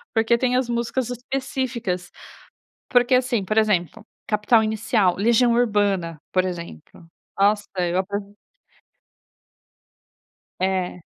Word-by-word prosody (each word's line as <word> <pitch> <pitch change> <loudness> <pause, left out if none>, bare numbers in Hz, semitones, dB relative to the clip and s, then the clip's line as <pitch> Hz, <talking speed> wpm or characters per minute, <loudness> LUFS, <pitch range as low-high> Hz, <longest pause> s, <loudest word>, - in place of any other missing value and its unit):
Porque 225 +1 +3
tem 250 0 +1
as 255 -1 0
músicas 240 +1 -2
específicas, 245 -7 -3 0.8
porque 245 +1 +3
assim, 245 -5 +1
por 215 +3 0
exemplo, 210 -1 0 0.2
Capital 210 +2 +3
Inicial, 215 -3 +1
Legião 235 +4 +3
Urbana, 205 -8 +1
por 185 0 +2
exemplo, 170 - -8 0.3
nossa, 205 +1 +2
eu 175 0 0
aprov 200 +1 -4 2.3
É. 185 -1 -1
215 Hz, 100 wpm, -23 LUFS, 185-240 Hz, 2.3 s, Porque